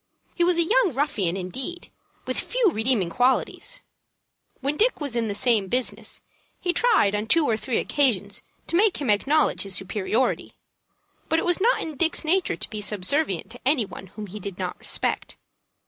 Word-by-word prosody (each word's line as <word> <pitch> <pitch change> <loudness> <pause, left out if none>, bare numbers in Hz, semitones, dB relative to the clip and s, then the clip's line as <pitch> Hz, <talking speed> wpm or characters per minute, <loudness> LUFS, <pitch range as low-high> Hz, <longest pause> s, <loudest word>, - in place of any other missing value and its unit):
He 350 - +1
was 350 0 +3
a 340 - +4
young 430 - +2
ruffian, 205 - 0
indeed, 260 - -5 0.3
with - - 0
few - - +2
redeeming 220 - +1
qualities. 265 - 0 0.8
When 280 +3 -1
Dick 470 +8 +2
was 285 -5 -4
in 230 -1 0
the 205 - -2
same 225 -5 +2
business, 250 +5 -2 0.4
he 355 - 0
tried 355 - +3
on 210 +1 -2
two 330 +4 +4
or 225 - +2
three 220 +3 -2
occasions 220 -9 +1 0.2
to - - -3
make 405 +2 +4
him 275 -7 0
acknowledge 280 +9 +2
his 195 -2 0
superiority; 205 +6 -1 0.8
but 320 - +2
it - - 0
was 355 +1 +2
not 480 +4 +3
in 310 -3 -7
Dick's 330 +1 +1
nature 365 +3 +2
to - - -3
be 215 -1 -4
subservient 210 - 0
to 245 - -10
any 265 -4 +2
one 190 - -10
whom 210 +3 -8
he 205 +2 -8
did 195 -2 -6
not 180 -1 -4
respect. - - -2
255 Hz, 180 wpm, -24 LUFS, 205-335 Hz, 0.8 s, a